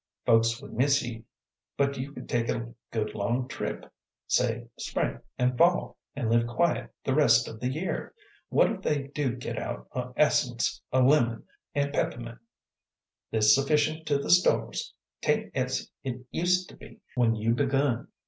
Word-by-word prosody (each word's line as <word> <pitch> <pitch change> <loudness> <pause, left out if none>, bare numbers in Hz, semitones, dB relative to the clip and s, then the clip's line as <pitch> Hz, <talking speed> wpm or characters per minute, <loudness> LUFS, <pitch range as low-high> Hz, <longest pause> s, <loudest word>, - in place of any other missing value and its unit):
"Folks 115 0 +4
would - - -10
miss 140 +4 +3
ye, 115 -1 -7 0.5
but 140 0 +2
you 135 +2 -5
could - - -9
take 120 -1 0
a 115 +1 -3 0.2
good 110 -2 -2
long 120 +5 -1
trip, - - -4 0.4
say - - +1
spring - - -2 0.2
an' 125 0 +2
fall, 175 +7 +3 0.2
an' 135 -5 -2
live 115 0 +3
quiet 155 +8 0
the 135 - 0
rest 120 -5 +5
of 110 - -8
the 125 - -1
year. 155 +8 -3 0.3
What - - +4
if 200 -4 -5
they 145 -6 -1
do 140 -4 -1
git 125 - -4
out - - -5
o' 125 0 -3
essence 125 -5 +2
o' 130 - +3
lemon 125 -4 +3 0.3
an' 140 0 +1
pep'mint! 115 -4 -2 0.9
There's 110 -1 +5
sufficient 150 +3 +1
to 145 -2 +3
the 140 - -2
stores; 185 - +3 0.3
't - - +2
ain't - - -5
as - - -1
't 125 -2 -5
used 180 +1 +1
to - - -14
be - - -14
when 120 -3 +3
you 110 +2 +1
begun." 135 -1 +1
125 Hz, 165 wpm, -28 LUFS, 115-145 Hz, 0.9 s, rest